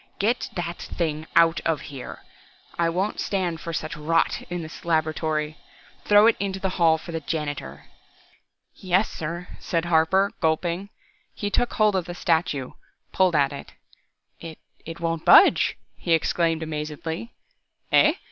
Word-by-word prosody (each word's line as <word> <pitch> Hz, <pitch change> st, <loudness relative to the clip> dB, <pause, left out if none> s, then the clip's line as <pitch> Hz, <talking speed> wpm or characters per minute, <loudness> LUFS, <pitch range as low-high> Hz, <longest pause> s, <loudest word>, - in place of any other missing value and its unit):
"Get 225 Hz, +5 st, 0 dB
that 175 Hz, -1 st, -4 dB
thing 155 Hz, -2 st, -3 dB
out 165 Hz, 0 st, +5 dB
of 165 Hz, -2 st, 0 dB
here! 130 Hz, -2 st, -8 dB, 0.5 s
I 170 Hz, -1 st, +1 dB
won't 185 Hz, +5 st, -2 dB
stand 175 Hz, -5 st, -2 dB
for 170 Hz, -, -5 dB
such 155 Hz, -1 st, -4 dB
rot 165 Hz, +2 st, +1 dB
in 175 Hz, -1 st, -4 dB
this 160 Hz, -, -10 dB
laboratory. 155 Hz, -2 st, -1 dB, 0.5 s
Throw 205 Hz, +1 st, +6 dB
it 230 Hz, -, +5 dB
into 195 Hz, -1 st, -2 dB
the 190 Hz, -, -1 dB
hall 160 Hz, -1 st, +5 dB
for 170 Hz, -, -9 dB
the 165 Hz, -, -3 dB
janitor!" 145 Hz, -, -5 dB, 0.9 s
"Ye 185 Hz, -, -13 dB
yessir," 175 Hz, -3 st, 0 dB
said 165 Hz, -1 st, -1 dB
Harper, 175 Hz, +4 st, +3 dB
gulping. 170 Hz, +4 st, 0 dB, 0.5 s
He 205 Hz, -1 st, -3 dB
took 245 Hz, -, 0 dB
hold 215 Hz, -2 st, +3 dB
of 185 Hz, -3 st, 0 dB
the 175 Hz, -, -7 dB
statue, 160 Hz, -7 st, 0 dB, 0.4 s
pulled 185 Hz, -3 st, +3 dB
at 140 Hz, -1 st, +2 dB
it. 140 Hz, -, -9 dB, 0.7 s
"It 165 Hz, -1 st, -9 dB, 0.3 s
it 165 Hz, +1 st, -7 dB
won't 165 Hz, -1 st, -2 dB
budge," -, -, +6 dB, 0.2 s
he 170 Hz, -, -1 dB
exclaimed 165 Hz, 0 st, +1 dB
amazedly. 160 Hz, +6 st, -5 dB, 0.6 s
"Eh? -, -, +5 dB
165 Hz, 145 wpm, -24 LUFS, 155-180 Hz, 0.9 s, Throw